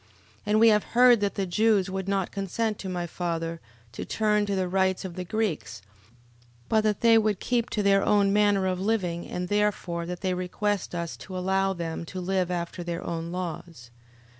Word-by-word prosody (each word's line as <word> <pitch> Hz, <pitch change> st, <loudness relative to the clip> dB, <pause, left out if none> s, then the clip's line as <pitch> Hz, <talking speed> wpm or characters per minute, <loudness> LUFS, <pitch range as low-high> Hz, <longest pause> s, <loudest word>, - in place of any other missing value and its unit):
11:24. -, -, -31 dB, 0.4 s
And 210 Hz, +1 st, +3 dB
we 230 Hz, -, +7 dB
have 210 Hz, -1 st, +3 dB
heard 245 Hz, -1 st, +5 dB
that 200 Hz, -1 st, 0 dB
the 195 Hz, -, -1 dB
Jews 205 Hz, +1 st, +2 dB
would 190 Hz, 0 st, -4 dB
not 195 Hz, -2 st, 0 dB
consent 205 Hz, +2 st, -2 dB
to 190 Hz, -, -5 dB
my 175 Hz, -1 st, -2 dB
father 165 Hz, -1 st, -3 dB, 0.3 s
to 115 Hz, -, -6 dB
turn 210 Hz, -1 st, +1 dB
to 200 Hz, -, 0 dB
the 185 Hz, -1 st, 0 dB
rites 190 Hz, 0 st, +1 dB
of 185 Hz, -, -6 dB
the 180 Hz, +1 st, -5 dB
Greeks 175 Hz, -, -3 dB, 0.8 s
but 220 Hz, -, +3 dB
that 215 Hz, -2 st, 0 dB
they 230 Hz, -1 st, +6 dB
would 215 Hz, -3 st, 0 dB
keep 240 Hz, -2 st, 0 dB
to 210 Hz, -, -1 dB
their 195 Hz, 0 st, +4 dB
own 200 Hz, -1 st, +3 dB
manner 205 Hz, -2 st, +3 dB
of 185 Hz, -1 st, -1 dB
living 185 Hz, -5 st, -1 dB
and 180 Hz, 0 st, -4 dB
therefore 195 Hz, -4 st, -1 dB
that 180 Hz, 0 st, -5 dB
they 185 Hz, -1 st, 0 dB
request 185 Hz, +2 st, -2 dB
us 170 Hz, -1 st, -3 dB
to 185 Hz, -, -8 dB
allow 190 Hz, +1 st, +1 dB
them 170 Hz, -2 st, -4 dB
to 185 Hz, +3 st, -7 dB
live 185 Hz, 0 st, 0 dB
after 175 Hz, 0 st, -4 dB
their 170 Hz, 0 st, -4 dB
own 170 Hz, 0 st, -4 dB
laws. 170 Hz, -8 st, -6 dB
190 Hz, 200 wpm, -26 LUFS, 175-210 Hz, 0.8 s, we